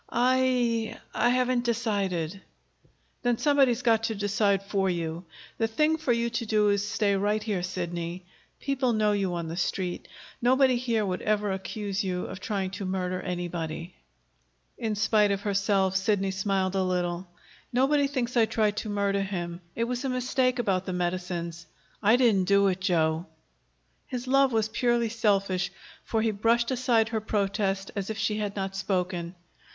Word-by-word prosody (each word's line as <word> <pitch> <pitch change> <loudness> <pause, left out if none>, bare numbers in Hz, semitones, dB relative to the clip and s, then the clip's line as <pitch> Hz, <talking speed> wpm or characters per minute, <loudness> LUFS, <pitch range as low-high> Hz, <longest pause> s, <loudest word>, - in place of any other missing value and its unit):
"I 245 -2 +1 0.2
I 240 - +2
haven't 250 0 +2
decided." 200 -7 -1 0.8
"Then 245 -1 +1
somebody's 270 -4 +3
got 225 -2 +4
to 225 - -2
decide 200 -1 +1
for 195 -1 0
you. 170 0 -3 0.3
The 225 - +2
thing 305 +8 +2
for 310 -5 -1
you 235 0 +1
to 230 0 -2
do 210 -1 +3
is 200 -1 +2
to 205 - -4
stay 205 -2 +1
right 210 +2 0
here, 205 -5 -1
Sidney. 175 -1 -4 0.3
People 265 -3 0
know 215 -1 +2
you 195 -3 0
on 170 -1 -3
the 165 - -5
Street. 180 0 -2 0.3
Nobody 260 +1 +4
here 230 -3 0
would 185 -1 -2
ever 210 -1 +1
accuse 200 +1 -3
you 180 -1 -2
of 190 - -7
trying 190 -1 -2
to 195 0 -5
murder 185 -1 -2
anybody." 175 -2 -4 0.8
In 220 -2 -2
spite 210 0 +3
of 200 0 0
herself, 195 -2 +1
Sidney 195 0 +1
smiled 190 -1 0
a 195 - +1
little. 180 -1 -1 0.4
"Nobody 280 +3 +3
thinks 255 -3 -2
I 230 -2 +5
tried 210 -2 +1
to 215 - -3
murder 200 -1 0
him. 175 -3 -4
It 230 - 0
was 245 +2 -2
a 270 - -1
mistake 255 0 +1
about 195 -6 0
the 185 - -2
medicines. 175 -2 -3 0.3
I 215 +2 +5
didn't 225 -7 +3
do 200 0 +4
it, 185 0 -2
Joe." 165 -3 +1 0.8
His 250 0 -4
love 275 +1 +4
was 220 -2 +1
purely 235 0 +1
selfish, 195 -5 +1 0.3
for 220 -1 0
he 225 - +2
brushed 230 +4 +2
aside 240 -3 +2
her 220 -1 -1
protest 195 -2 -1
as 200 -1 -3
if 220 - -3
she 215 -1 0
had 205 -1 -3
not 195 -1 -3
spoken. 180 -2 -2
205 Hz, 170 wpm, -27 LUFS, 185-235 Hz, 0.8 s, I